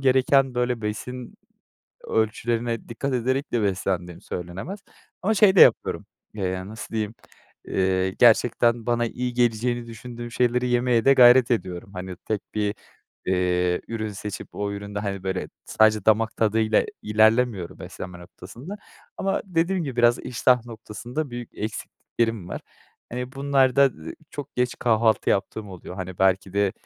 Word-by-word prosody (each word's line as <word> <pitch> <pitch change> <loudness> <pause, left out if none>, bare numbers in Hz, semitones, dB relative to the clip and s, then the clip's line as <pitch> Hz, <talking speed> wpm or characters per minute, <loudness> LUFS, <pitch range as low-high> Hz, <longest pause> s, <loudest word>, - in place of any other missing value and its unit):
gereken, 135 0 +3
böyle, 125 -1 0
besin 120 +4 -5 0.7
ölçülerine 115 +1 -1
dikkat 130 +4 -3
ederek 130 +4 -1
de 115 -3 +1
beslendiğim 90 -3 -2
söylenemez 95 - -6 0.4
ama 220 +4 +2
şey 200 -2 +5
de - - +7
yapıyorum. - - +5 0.3
Eee, 100 - -3
yani, 95 +1 -4
nasıl 110 +1 -8
diyeyim? 110 0 -2 0.5
Eee, 95 0 +1
gerçekten 120 +1 +3
bana 120 0 +1
iyi 125 +1 -3
geleceğini 120 0 +1
düşündüğüm 120 +1 -8
şeyleri 125 +1 +1
yemeye 120 -1 +2
de 135 - +7
gayret 125 -1 +7
ediyorum. 95 -5 -2
Hani, 90 0 -6
tek 105 +2 -3
bir, 105 -1 0 0.5
eee, 90 -1 +1
ürün 110 -2 -3
seçip 100 0 -6
o 100 0 -2
üründe, 100 0 -5
hani, 100 -2 -4
böyle, 95 -1 -3 0.2
sadece 110 -2 +3
damak 110 +1 +3
tadıyla 110 0 +2 0.2
ilerlemiyorum 110 -2 +2
beslenme 90 -1 -8
noktasında. 120 - -10 0.4
Ama 195 - -1
dediğim 175 -1 0
gibi 130 -3 -5
biraz 120 0 +4
iştah 125 0 +1
noktasında 120 +6 -6
büyük 120 -1 -7
eksikliklerim 110 -1 -3
var. - - -5 0.5
Eee, 125 +1 -4
bunlar 135 -2 +2
da, 140 - +7 0.2
eee, - - -6 0.2
çok 145 -2 -8
geç 125 0 +1
kahvaltı 110 -2 +2
yaptığım 100 +2 -1
oluyor. 90 -1 -9
Hani, 95 -1 -6
belki 95 0 +2
de 100 -1 +1
115 Hz, 145 wpm, -24 LUFS, 100-125 Hz, 0.7 s, de